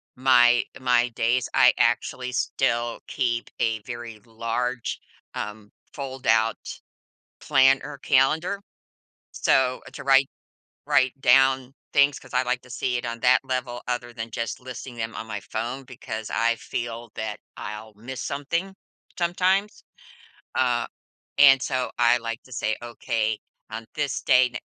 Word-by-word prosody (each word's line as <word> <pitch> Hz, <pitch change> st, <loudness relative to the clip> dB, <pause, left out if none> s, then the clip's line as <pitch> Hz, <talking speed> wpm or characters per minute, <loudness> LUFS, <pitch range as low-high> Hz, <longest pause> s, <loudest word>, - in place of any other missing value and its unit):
my 120 Hz, -2 st, +5 dB, 0.2 s
my 125 Hz, -1 st, +3 dB
days, 120 Hz, +2 st, +1 dB
I -, -, +6 dB
actually 125 Hz, 0 st, +1 dB
still 120 Hz, -2 st, 0 dB
keep 120 Hz, -1 st, -1 dB
a 110 Hz, -2 st, 0 dB
very 120 Hz, -1 st, -8 dB
large, 115 Hz, +2 st, -3 dB, 0.4 s
um, 105 Hz, 0 st, -6 dB, 0.2 s
fold-out 115 Hz, -5 st, +1 dB, 0.8 s
planner 135 Hz, +2 st, +3 dB
calendar, 155 Hz, +8 st, +2 dB, 0.7 s
so, 130 Hz, -1 st, +2 dB
to -, -, -8 dB
write 135 Hz, 0 st, +5 dB, 0.6 s
write 130 Hz, +1 st, +2 dB
down 130 Hz, 0 st, +4 dB, 0.2 s
things 140 Hz, 0 st, +4 dB
'cause 130 Hz, -, -14 dB
I -, -, +3 dB
like 125 Hz, 0 st, -1 dB
to 125 Hz, -, -17 dB
see 125 Hz, -1 st, -1 dB
it 120 Hz, -, -5 dB
on 115 Hz, 0 st, -5 dB
that 125 Hz, +1 st, +4 dB
level 130 Hz, -2 st, -3 dB
other 120 Hz, -1 st, -2 dB
than 115 Hz, -1 st, -6 dB
just 115 Hz, +3 st, -4 dB
listing 125 Hz, 0 st, -8 dB
them 115 Hz, -1 st, -4 dB
on 110 Hz, -, -6 dB
my 105 Hz, -2 st, -5 dB
phone 120 Hz, +7 st, -4 dB
because 115 Hz, -3 st, -7 dB
I 115 Hz, 0 st, +2 dB
feel 115 Hz, 0 st, -5 dB
that 110 Hz, -1 st, -4 dB, 0.2 s
I'll 105 Hz, 0 st, -7 dB
miss 125 Hz, +5 st, -7 dB
something 170 Hz, +7 st, -2 dB, 0.4 s
sometimes, 185 Hz, +4 st, +1 dB, 0.7 s
uh, 120 Hz, -2 st, +1 dB, 0.5 s
and 135 Hz, -2 st, +8 dB
so 130 Hz, -1 st, -1 dB
I 120 Hz, 0 st, +5 dB
like 115 Hz, 0 st, -5 dB
to 130 Hz, -, -17 dB
say, 110 Hz, -2 st, -1 dB
"Okay, 115 Hz, -2 st, -2 dB, 0.3 s
on 110 Hz, +1 st, -6 dB
this 145 Hz, -3 st, -1 dB
date, 125 Hz, -1 st, +4 dB
125 Hz, 135 wpm, -25 LUFS, 115-130 Hz, 0.8 s, and